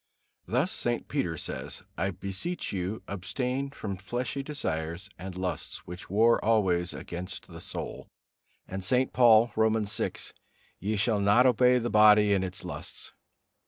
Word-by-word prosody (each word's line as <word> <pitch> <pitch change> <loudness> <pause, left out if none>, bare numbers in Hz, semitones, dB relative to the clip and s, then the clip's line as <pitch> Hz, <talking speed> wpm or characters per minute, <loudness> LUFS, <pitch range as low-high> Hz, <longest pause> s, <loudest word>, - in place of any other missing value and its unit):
Thus 130 +10 +1
St. 120 0 -2
Peter 110 - -1
says, - - -5
"I 95 +4 0
beseech 100 - -4
you, 95 +3 -3
abstain 125 +8 -2
from 105 -8 -5
fleshly 120 +7 -3
desires 95 - -4
and 90 0 -7
lusts, 90 -1 -4
which 90 +1 -9
war 115 +5 +4
always 95 -6 +2
against 90 +2 -7
the - - -10
soul." - - -6 0.6
And 95 0 -5
St. 125 +7 +2
Paul, 115 -2 +6
Romans 110 -2 +2
vi, - - +1 0.7
"Ye 105 +4 -1
shall 105 +1 +2
not 105 +5 +5
obey 125 0 +5
the 120 -1 -1
body 105 -1 +7
in 95 - +2
its 95 0 -4
lusts." - - -7
105 Hz, 145 wpm, -29 LUFS, 95-120 Hz, 0.7 s, body